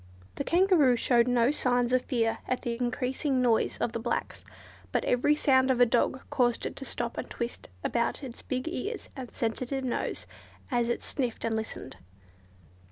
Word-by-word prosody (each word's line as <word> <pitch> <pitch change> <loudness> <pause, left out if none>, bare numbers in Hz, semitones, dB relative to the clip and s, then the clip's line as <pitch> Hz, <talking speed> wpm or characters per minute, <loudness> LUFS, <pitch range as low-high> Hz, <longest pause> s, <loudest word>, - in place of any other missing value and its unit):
The - - -3
Kangaroo 340 -7 +4
showed 235 0 +3
no 245 +1 +3
signs 245 -4 +1
of 255 - +4
fear 230 -4 0
at 255 - -1
the 235 -1 -1
increasing 255 +3 -1
noise 240 -3 +2
of 235 - -1
the 230 - -3
blacks, 235 +1 -3 0.5
but - - 0
every 255 +5 +3
sound 260 -3 +4
of 255 -2 +2
a 245 - +8
dog 245 +2 +1
caused 240 -2 +2
it - - -4
to 270 - -6
stop - - -4
and - - -5
twist 235 0 -5
about 235 +4 0
its 250 -3 -7
big 255 +3 -3
ears 410 +6 -4
and 260 -4 -6
sensitive 255 +4 -2
nose, 250 - -2 0.5
as 240 -1 +1
it 240 - -1
sniffed 250 -6 -2
and 225 -1 0
listened. 220 -11 -5
250 Hz, 175 wpm, -29 LUFS, 235-265 Hz, 0.5 s, a